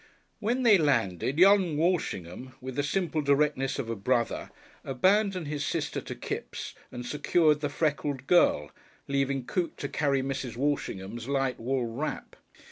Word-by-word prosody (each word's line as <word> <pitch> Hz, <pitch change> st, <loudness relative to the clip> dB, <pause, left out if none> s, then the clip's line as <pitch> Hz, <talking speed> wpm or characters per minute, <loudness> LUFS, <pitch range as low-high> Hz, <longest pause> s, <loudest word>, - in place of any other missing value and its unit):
When 240 Hz, +4 st, 0 dB
they 215 Hz, -5 st, +6 dB
landed 130 Hz, -, +1 dB
young 185 Hz, -3 st, +5 dB
Walshingham, 130 Hz, -, -1 dB
with 130 Hz, 0 st, -7 dB
the 145 Hz, -, +1 dB
simple 160 Hz, +1 st, -1 dB
directness 140 Hz, -1 st, +1 dB
of 115 Hz, -, -3 dB
a 115 Hz, -, -2 dB
brother, 115 Hz, +3 st, 0 dB, 0.3 s
abandoned 185 Hz, +5 st, +2 dB
his 145 Hz, -1 st, -3 dB
sister 145 Hz, -1 st, -2 dB
to -, -, -7 dB
Kipps -, -, -5 dB, 0.2 s
and 125 Hz, -1 st, -6 dB
secured 150 Hz, +2 st, +2 dB
the 145 Hz, -, -1 dB
freckled 145 Hz, -3 st, -1 dB
girl, 75 Hz, -, +3 dB, 0.4 s
leaving 140 Hz, -1 st, 0 dB
Coote 175 Hz, +4 st, -2 dB
to 140 Hz, -, -3 dB
carry 140 Hz, -2 st, 0 dB
Mrs. 130 Hz, -3 st, -4 dB
Walshingham's 120 Hz, -5 st, -2 dB
light 135 Hz, -2 st, 0 dB
wool 125 Hz, +1 st, -1 dB
wrap. 120 Hz, +7 st, -4 dB
140 Hz, 145 wpm, -28 LUFS, 125-160 Hz, 0.4 s, they